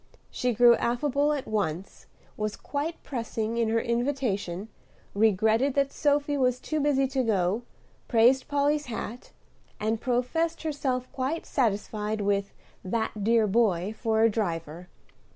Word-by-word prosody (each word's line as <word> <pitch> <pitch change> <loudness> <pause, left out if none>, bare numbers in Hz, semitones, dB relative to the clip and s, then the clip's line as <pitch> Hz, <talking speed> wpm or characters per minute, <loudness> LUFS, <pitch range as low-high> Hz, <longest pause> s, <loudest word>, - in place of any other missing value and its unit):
She 250 - 0
grew 240 +1 +7
affable 280 +4 +1
at 290 -3 -2
once, 195 -4 -3 0.3
was 215 -1 -3
quite 300 +4 -4
pressing 230 -3 -3
in 230 -1 +1
her 230 +1 +2
invitation, 235 -7 -1 0.5
regretted 220 +5 +2
that 275 -1 +2
Sophy 290 -1 +1
was 250 -2 +1
too 310 +3 -2
busy 280 -2 +2
to 265 -1 0
go, 205 -2 +1 0.5
praised 245 +3 +4
Polly's 290 0 +1
hat; 235 +1 -6 0.5
and 220 +1 -1
professed 290 +8 -1
herself 270 -5 -2
quite 270 +5 -2
satisfied 215 -3 -1
with 200 0 0 0.3
"that 215 +1 -2
dear 225 +1 +4
boy" 205 -3 +1
for 220 -1 +1
a 225 - +6
driver. 170 -5 -3
235 Hz, 135 wpm, -27 LUFS, 210-275 Hz, 0.5 s, grew